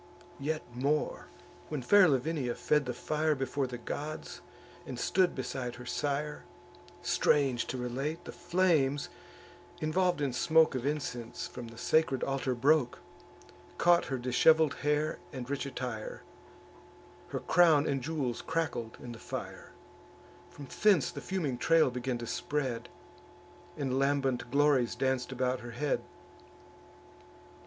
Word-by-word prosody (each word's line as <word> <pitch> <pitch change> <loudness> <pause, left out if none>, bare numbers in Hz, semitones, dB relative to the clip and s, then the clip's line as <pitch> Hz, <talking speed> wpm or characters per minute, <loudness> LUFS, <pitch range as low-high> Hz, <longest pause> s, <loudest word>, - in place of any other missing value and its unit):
Yet 155 +2 -2
more, 140 +5 -1 0.4
when 150 -4 -3
fair 200 +7 +7
Lavinia 135 -3 0
fed 150 -1 +1
the 125 - -1
fire 155 0 0
Before 135 0 -1
the 125 -1 -6
gods, 150 +5 -6 0.4
and 125 -2 -7
stood 185 +5 +2
beside 130 -2 -4
her 125 0 -10
sire, 145 +3 -2 0.6
Strange 135 -5 +2
to 130 - -3
relate, 135 +7 -3
the - - -6
flames, 155 -6 +1 0.7
involv'd 175 +2 +1
in 140 -3 -1
smoke 160 +5 +4
Of 130 +1 -2
incense, 140 -6 -3
from 120 - -8
the 115 0 -12
sacred 150 -3 +2
altar 135 -2 -1
broke, 140 0 +3 0.8
Caught 175 0 +4
her 135 - -2
dishevel'd 140 +5 +4
hair 150 +1 0
and 130 -3 -6
rich 140 0 -2
attire; 125 -5 -5 1.0
Her - - -3
crown 160 -4 +5
and 135 -2 0
jewels 135 -4 -2
crackled 155 -9 -2
in 120 - -7
the 115 - -9
fire: - - -7 0.8
From 140 - -10
thence 195 -11 +4
the - - -7
fuming 155 -10 -2
trail 165 -3 +4
began 125 0 -2
to 120 - -6
spread 125 -2 -2 0.9
And 135 -3 -1
lambent 135 -3 +1
glories 140 -3 +3
danc'd 130 0 0
about 130 0 0
her 120 0 -8
head. 145 +1 0
140 Hz, 130 wpm, -31 LUFS, 125-155 Hz, 1.0 s, fair